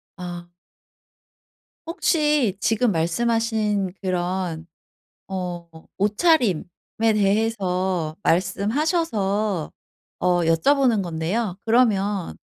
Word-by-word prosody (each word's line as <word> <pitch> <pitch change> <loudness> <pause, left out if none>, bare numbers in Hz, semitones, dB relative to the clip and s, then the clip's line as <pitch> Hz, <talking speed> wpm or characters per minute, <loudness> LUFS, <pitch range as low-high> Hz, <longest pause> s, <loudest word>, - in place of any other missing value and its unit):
아. 175 -1 -7 1.4
혹시 300 - +1
지금 225 +2 +2
말씀하신 210 +2 0
그런 180 -3 -2 0.6
어 180 -3 -5 0.3
옷차림에 210 - +2 0.5
대해서 190 -5 0
말씀하셔서 205 - 0 0.5
어 - - -5 0.2
여쭤보는 225 - +3
건데요. 175 +4 -2
그러면 205 - +1
200 Hz, 170 characters per minute, -23 LUFS, 180-230 Hz, 1.4 s, 여쭤보는